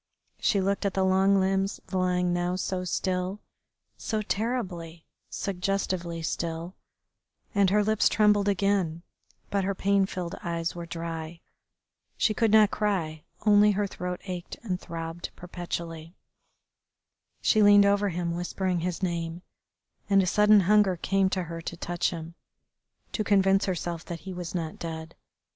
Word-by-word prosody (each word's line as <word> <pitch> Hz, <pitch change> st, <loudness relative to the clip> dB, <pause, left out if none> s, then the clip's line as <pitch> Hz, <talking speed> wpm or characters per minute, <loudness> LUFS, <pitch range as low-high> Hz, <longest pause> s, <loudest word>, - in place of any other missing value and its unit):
She 200 Hz, -, +2 dB
looked 195 Hz, +1 st, 0 dB
at 200 Hz, -2 st, -1 dB
the 190 Hz, -1 st, +2 dB
long 190 Hz, +1 st, +4 dB
limbs 195 Hz, +1 st, 0 dB
lying 180 Hz, -1 st, +1 dB
now 175 Hz, +1 st, 0 dB
so 185 Hz, 0 st, -2 dB
still, 185 Hz, +2 st, -1 dB, 0.6 s
so 215 Hz, -1 st, -2 dB
terribly, 190 Hz, -8 st, -3 dB, 0.2 s
suggestively 180 Hz, -3 st, -2 dB
still, 165 Hz, +2 st, -3 dB, 0.8 s
and 200 Hz, -3 st, +4 dB
her 210 Hz, +2 st, +3 dB
lips 215 Hz, 0 st, +3 dB
trembled 210 Hz, -2 st, +3 dB
again, 195 Hz, -4 st, +1 dB, 0.5 s
but 200 Hz, -1 st, +1 dB
her 195 Hz, +1 st, -1 dB
pain 195 Hz, 0 st, +2 dB
filled 180 Hz, -2 st, -5 dB
eyes 170 Hz, -1 st, -2 dB
were 170 Hz, -1 st, -7 dB
dry. 165 Hz, -1 st, -5 dB, 0.8 s
She 215 Hz, -, +2 dB
could 225 Hz, 0 st, +2 dB
not 215 Hz, -1 st, +6 dB
cry, 170 Hz, -7 st, -1 dB, 0.2 s
only 210 Hz, 0 st, +6 dB
her 205 Hz, +1 st, 0 dB
throat 180 Hz, -2 st, -5 dB
ached 180 Hz, -2 st, -6 dB
and 185 Hz, -5 st, -2 dB
throbbed 165 Hz, 0 st, -6 dB
perpetually. 170 Hz, -1 st, -6 dB, 1.3 s
She 215 Hz, -, +4 dB
leaned 205 Hz, -1 st, +7 dB
over 200 Hz, 0 st, +3 dB
him 170 Hz, -1 st, -2 dB
whispering 180 Hz, +1 st, -1 dB
his 180 Hz, +2 st, -3 dB
name, 170 Hz, -1 st, -2 dB, 0.7 s
and 195 Hz, -1 st, +5 dB
a -, -, 0 dB
sudden 210 Hz, +2 st, +5 dB
hunger 200 Hz, 0 st, +4 dB
came 195 Hz, +2 st, +1 dB
to 185 Hz, -1 st, -1 dB
her 165 Hz, 0 st, -6 dB
to 165 Hz, +1 st, -6 dB
touch 175 Hz, 0 st, -1 dB
him, 165 Hz, -1 st, -7 dB, 0.8 s
to 215 Hz, -, -1 dB
convince 195 Hz, -1 st, +3 dB
herself 175 Hz, -2 st, -3 dB
that 170 Hz, -1 st, -6 dB
he 190 Hz, -, -7 dB
was 180 Hz, 0 st, -6 dB
not 160 Hz, -3 st, -3 dB
dead. 160 Hz, 0 st, -6 dB
185 Hz, 145 wpm, -27 LUFS, 170-200 Hz, 1.3 s, leaned